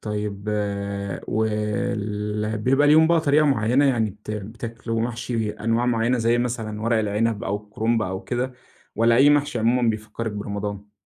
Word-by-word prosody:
طيب 105 Hz, -1 st, -4 dB, 0.8 s
وال 105 Hz, -1 st, -1 dB
بيبقى 135 Hz, +6 st, +3 dB
ليهم 160 Hz, +2 st, +6 dB
بقى 170 Hz, -1 st, +3 dB
طريقة 150 Hz, 0 st, +3 dB
معينة، 125 Hz, +1 st, +3 dB
يعني 115 Hz, -6 st, +2 dB
بت 105 Hz, +2 st, -11 dB
بتاكلوا 115 Hz, +2 st, -4 dB
محشي 115 Hz, -1 st, -2 dB
أنواع 115 Hz, +3 st, -1 dB
معينة، 120 Hz, +1 st, +1 dB
زي 115 Hz, +1 st, +2 dB
مثلًا 115 Hz, -3 st, -3 dB
ورق 115 Hz, 0 st, +2 dB
العنب 105 Hz, +1 st, 0 dB
أو 100 Hz, -, -1 dB
الكرنب 110 Hz, +2 st, 0 dB
أو 95 Hz, 0 st, -4 dB
كده، 125 Hz, +1 st, -2 dB, 0.4 s
والّا 115 Hz, +1 st, +4 dB
أي 140 Hz, +3 st, +6 dB
محشي 145 Hz, -4 st, +2 dB
عمومًا 120 Hz, +1 st, +2 dB
بيفكرِك 110 Hz, +1 st, -5 dB
برمضان؟ 105 Hz, 0 st, -5 dB
115 Hz, 145 wpm, -23 LUFS, 105-120 Hz, 0.8 s, ليهم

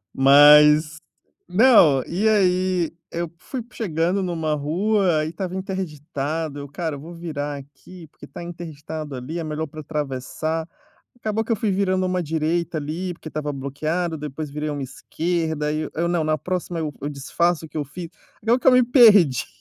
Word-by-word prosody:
Mas 150 Hz, +3 st, +7 dB, 0.5 s
não, 180 Hz, -, +6 dB
e 200 Hz, +6 st, 0 dB
aí 185 Hz, -4 st, +2 dB, 0.2 s
eu 170 Hz, 0 st, -3 dB
p 170 Hz, -, -28 dB
fui 255 Hz, -3 st, -5 dB
chegando 180 Hz, -1 st, -1 dB
numa 165 Hz, -4 st, -1 dB
rua, 170 Hz, +2 st, +1 dB
e 155 Hz, -, -4 dB
estava 180 Hz, +2 st, -5 dB
interditado, 160 Hz, -5 st, -4 dB
eu: 140 Hz, 0 st, -7 dB
"Cara, 160 Hz, 0 st, -4 dB
eu -, -, -9 dB
vou 165 Hz, +4 st, -10 dB
virar 150 Hz, -4 st, -4 dB
aqui, 155 Hz, +5 st, -13 dB
porque -, -, -14 dB
tá -, -, -9 dB
interditado 160 Hz, -3 st, -7 dB
ali, 130 Hz, +7 st, -5 dB
é 165 Hz, -, -3 dB
melhor 155 Hz, +1 st, -3 dB
pra 155 Hz, +1 st, -10 dB
atravessar". 150 Hz, +2 st, -3 dB, 0.5 s
Acabou 220 Hz, -2 st, -2 dB
que 225 Hz, -, -11 dB
eu 225 Hz, -, +2 dB
fui 210 Hz, 0 st, -1 dB
virando 185 Hz, -1 st, +1 dB
uma 185 Hz, 0 st, -1 dB
direita, 165 Hz, +1 st, -1 dB
ali, 165 Hz, +5 st, -4 dB
porque 165 Hz, -, -10 dB
estava 150 Hz, -1 st, -4 dB
bloqueado, 155 Hz, +5 st, -2 dB
depois 150 Hz, 0 st, -6 dB
virei 150 Hz, +1 st, -3 dB
uma 145 Hz, -1 st, -4 dB
esquerda, 160 Hz, +2 st, -2 dB
aí 150 Hz, +1 st, -1 dB
eu 155 Hz, -, -4 dB
eu, 170 Hz, +2 st, 0 dB
"não, 170 Hz, -2 st, 0 dB
na 155 Hz, 0 st, +1 dB
próxima, 180 Hz, +2 st, -3 dB
eu 155 Hz, -2 st, -3 dB
eu 145 Hz, -, -3 dB
disfaço 160 Hz, +4 st, -1 dB
o -, -, -15 dB
que 155 Hz, -, -11 dB
eu 150 Hz, -, -1 dB
fiz", 165 Hz, +5 st, -8 dB, 0.3 s
acabou 230 Hz, +3 st, +3 dB
que -, -, -5 dB
eu -, -, +7 dB
me 250 Hz, -1 st, +6 dB
perdi. 205 Hz, -, +6 dB
160 Hz, 185 wpm, -22 LUFS, 150-180 Hz, 0.5 s, Mas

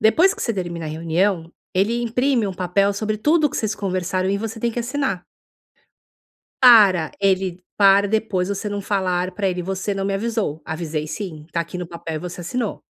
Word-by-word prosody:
depois 335 Hz, -, +5 dB
que 450 Hz, -, -6 dB
você 230 Hz, -, 0 dB
termina 170 Hz, -4 st, -4 dB
a -, -, -4 dB
reunião, 165 Hz, +2 st, 0 dB, 0.2 s
ele 220 Hz, +6 st, +1 dB
imprime 245 Hz, 0 st, +1 dB
um 190 Hz, -, -4 dB
papel 190 Hz, +2 st, +1 dB
sobre 215 Hz, +1 st, -2 dB
tudo 300 Hz, +5 st, +3 dB
que -, -, -5 dB
vocês 215 Hz, -1 st, -1 dB
conversaram 185 Hz, -2 st, -1 dB
e 200 Hz, -, 0 dB
você 225 Hz, +1 st, -5 dB
tem 235 Hz, +1 st, 0 dB
que 240 Hz, -, -2 dB
assinar. 245 Hz, -6 st, -2 dB, 1.4 s
Para 200 Hz, -, +7 dB
ele 190 Hz, -2 st, +1 dB, 0.2 s
para 200 Hz, 0 st, +5 dB
depois 205 Hz, -4 st, 0 dB
você 200 Hz, +1 st, -3 dB
não 205 Hz, 0 st, -3 dB
falar 185 Hz, -2 st, 0 dB
pra 195 Hz, +1 st, -1 dB
ele: 180 Hz, -1 st, -2 dB
"Você 190 Hz, +2 st, -2 dB
não 195 Hz, 0 st, -2 dB
me 195 Hz, -, 0 dB
avisou". 205 Hz, -6 st, -2 dB
"Avisei 155 Hz, -1 st, -4 dB
sim, 155 Hz, -4 st, -6 dB
tá 170 Hz, -, -1 dB
aqui 170 Hz, +2 st, -5 dB
no 180 Hz, -, -4 dB
papel, 165 Hz, -2 st, -6 dB
você 180 Hz, 0 st, -6 dB
assinou". 230 Hz, +4 st, -3 dB
195 Hz, 190 wpm, -21 LUFS, 180-220 Hz, 1.4 s, Para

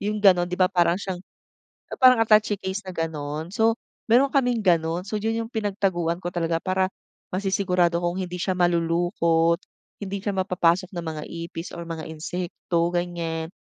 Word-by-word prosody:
yung 210 Hz, +1 st, -1 dB
gano'n. 185 Hz, -4 st, +4 dB
Di 180 Hz, -, -3 dB
ba 185 Hz, -, +4 dB
para 175 Hz, -1 st, +3 dB
siyang 190 Hz, -2 st, -5 dB, 0.8 s
parang 255 Hz, -2 st, +6 dB
attache 215 Hz, -2 st, +4 dB
case 190 Hz, +2 st, -4 dB
na 190 Hz, -, -7 dB
gano'n, 155 Hz, -2 st, -4 dB
so 225 Hz, +5 st, +1 dB, 0.3 s
mayro'n 255 Hz, +4 st, +6 dB
kaming 250 Hz, -4 st, +1 dB
gano'n 170 Hz, -2 st, +1 dB
so 215 Hz, -, -3 dB
yun 225 Hz, +2 st, -1 dB
yung 225 Hz, -, -3 dB
pinagtaguan 190 Hz, -6 st, -1 dB
ko 175 Hz, -, -5 dB
talaga 165 Hz, -1 st, 0 dB
para 185 Hz, +1 st, 0 dB, 0.4 s
masisigurado 185 Hz, -2 st, +1 dB
kung 175 Hz, +2 st, -1 dB
hindi 180 Hz, -1 st, -4 dB
siya 180 Hz, +2 st, -1 dB
malulukot, 170 Hz, -1 st, +2 dB, 0.4 s
hindi 200 Hz, 0 st, -4 dB
siya 200 Hz, 0 st, -3 dB
mapapasok 185 Hz, 0 st, +1 dB
ng 175 Hz, -3 st, -5 dB
mga 150 Hz, -, -5 dB, 0.2 s
ipis 165 Hz, +1 st, -7 dB
or 170 Hz, -1 st, -7 dB
mga 165 Hz, -1 st, -5 dB
insekto 170 Hz, +1 st, -2 dB
ganyan. 170 Hz, -2 st, -2 dB
180 Hz, 165 wpm, -24 LUFS, 170-200 Hz, 0.8 s, parang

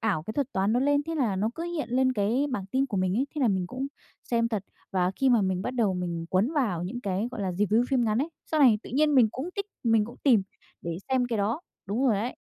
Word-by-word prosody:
ảo 205 Hz, -8 st, 0 dB
cái 215 Hz, +7 st, -6 dB
thuật 280 Hz, -1 st, -2 dB
toán 195 Hz, +2 st, +1 dB
nó 245 Hz, -, +2 dB
lên, 285 Hz, +1 st, +3 dB
thế 330 Hz, -, -3 dB
là 235 Hz, -10 st, 0 dB
nó 210 Hz, +4 st, 0 dB
cứ 330 Hz, -, -5 dB
hiện 345 Hz, -6 st, -3 dB
lên 260 Hz, +1 st, +3 dB
cái 235 Hz, +6 st, +1 dB
bảng 200 Hz, -6 st, -3 dB
tin 260 Hz, +7 st, 0 dB
của 210 Hz, -7 st, -4 dB
mình 185 Hz, 0 st, +1 dB
ấy, 265 Hz, +4 st, +1 dB
thế 300 Hz, -, -3 dB
là 255 Hz, -, +4 dB
mình 190 Hz, -3 st, 0 dB
cũng 255 Hz, +8 st, -4 dB, 0.4 s
xem 230 Hz, -1 st, +2 dB
thật. 215 Hz, -4 st, -2 dB, 0.3 s
Và 185 Hz, -1 st, +1 dB
khi 270 Hz, -, +2 dB
mà 235 Hz, -4 st, +4 dB
mình 190 Hz, -1 st, 0 dB
bắt 250 Hz, -, -2 dB
đầu 220 Hz, -6 st, +2 dB
mình 170 Hz, -2 st, -3 dB
cuốn 200 Hz, +10 st, +2 dB
vào 210 Hz, -, 0 dB
những 210 Hz, +8 st, -4 dB
cái, 200 Hz, +2 st, -1 dB
gọi 230 Hz, -, -6 dB
là, 190 Hz, -, -1 dB
review 210 Hz, +6 st, +2 dB
phim 255 Hz, -3 st, +3 dB
ngắn 215 Hz, 0 st, +1 dB
ấy, 290 Hz, +6 st, 0 dB, 0.2 s
sau 310 Hz, -1 st, +2 dB
này 235 Hz, -6 st, +6 dB
tự -, -, -10 dB
nhiên 300 Hz, +3 st, +3 dB
mình 245 Hz, -5 st, +6 dB
cũng 270 Hz, +7 st, -4 dB
thích, 400 Hz, 0 st, -2 dB, 0.2 s
mình 225 Hz, -2 st, +4 dB
cũng 235 Hz, -, -10 dB
tìm 240 Hz, -8 st, +5 dB, 0.4 s
để 170 Hz, -1 st, -3 dB
xem 260 Hz, -1 st, +2 dB
cái 235 Hz, -2 st, -2 dB
đó. 220 Hz, +10 st, 0 dB, 0.3 s
Đúng 215 Hz, +7 st, 0 dB
rồi 220 Hz, -6 st, +3 dB
ấy. 235 Hz, +5 st, -3 dB
230 Hz, 280 wpm, -27 LUFS, 195-260 Hz, 0.4 s, này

